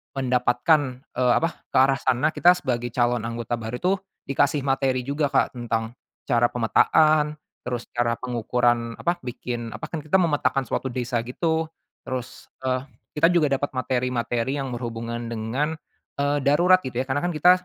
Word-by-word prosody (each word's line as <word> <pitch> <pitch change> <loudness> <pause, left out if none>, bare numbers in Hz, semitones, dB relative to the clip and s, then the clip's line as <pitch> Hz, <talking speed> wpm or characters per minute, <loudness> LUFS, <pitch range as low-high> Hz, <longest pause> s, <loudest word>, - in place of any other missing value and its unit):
mendapatkan, 125 +2 +1
eee, 125 -1 +3
apa, 165 - +3 0.2
ke - - +1
arah 135 +1 +4
sana, 130 +5 +1
kita 175 +1 +5
sebagai 120 -7 -2
calon 120 -1 +2
anggota 115 0 -3
baru 110 +2 -4
tuh 190 +2 +1 0.3
dikasih 140 +1 +1
materi 135 -2 +1
juga, 145 +1 0
Kak. - - +2
Tentang 115 -1 -2 0.3
cara 120 -2 +3
pemetaan, 150 +6 +3 0.3
terus 120 -1 -4
cara 120 -1 +1
pengukuran 120 -1 0
apa, 175 0 0
bikin 120 -1 -5
apa - - -6
kan 165 - -3
kita 155 +5 +3
memetakan 145 -5 +1
suatu 130 - -2
desa 120 -1 -1
gitu. 160 +5 -1 0.4
Terus, 130 -1 -6 0.2
eee, 130 0 +1 0.4
kita 165 - +6
juga 165 -4 +4
dapat 145 +1 0
materi-materi 125 0 -1
yang 135 -2 -4
berhubungan 115 0 -4
dengan, 125 +8 -2 0.4
eee, 145 +1 +1
darurat 175 +7 +5
gitu 130 -2 -5
ya. - - -4
Karena 140 +2 0
kan 175 - +1
kita 175 +4 +6
130 Hz, 160 wpm, -24 LUFS, 120-145 Hz, 0.4 s, kita